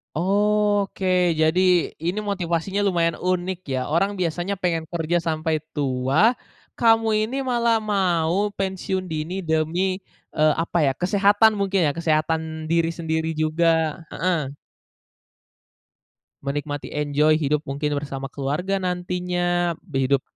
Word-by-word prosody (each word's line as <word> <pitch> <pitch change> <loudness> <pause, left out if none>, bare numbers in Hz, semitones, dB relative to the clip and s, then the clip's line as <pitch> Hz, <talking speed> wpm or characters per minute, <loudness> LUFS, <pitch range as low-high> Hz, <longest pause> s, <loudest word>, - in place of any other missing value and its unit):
Oke. 205 +2 +1 0.3
Jadi 160 +3 +3 0.4
ini 180 +5 -1
motivasinya 195 -1 -1
lumayan 170 -4 +1
unik 185 +1 -1 0.2
ya, 130 - 0
orang 170 +7 +1
biasanya 175 +3 -2
pengen 170 -3 0
kerja 170 0 0
sampai 160 -1 -1
tua, 140 - +2 0.4
kamu 225 -1 +4 0.2
ini 235 +5 -3
malah 235 -2 +2
mau 195 -2 +1
pensiun 190 -1 -2
dini 160 +5 -3
demi, 160 0 -1 0.6
eee, 155 -1 +4
apa 170 - -3
ya, 135 - +3
kesehatan 205 +3 +4
mungkin 195 -4 +1
ya? 145 - +2
Kesehatan 160 -1 -1
diri 165 0 +1
sendiri 160 -1 -2
juga, 160 0 +1
heeh. 165 -6 -1 1.9
Menikmati 145 +1 -4
enjoy, 150 +1 +2
hidup 150 -1 0
mungkin 145 +2 -1
bersama 140 -2 -4
keluarga 150 +9 -2
nantinya, 180 -1 -1
b 135 -1 -2
hidup 140 -1 +3
170 Hz, 120 wpm, -23 LUFS, 155-190 Hz, 1.9 s, kamu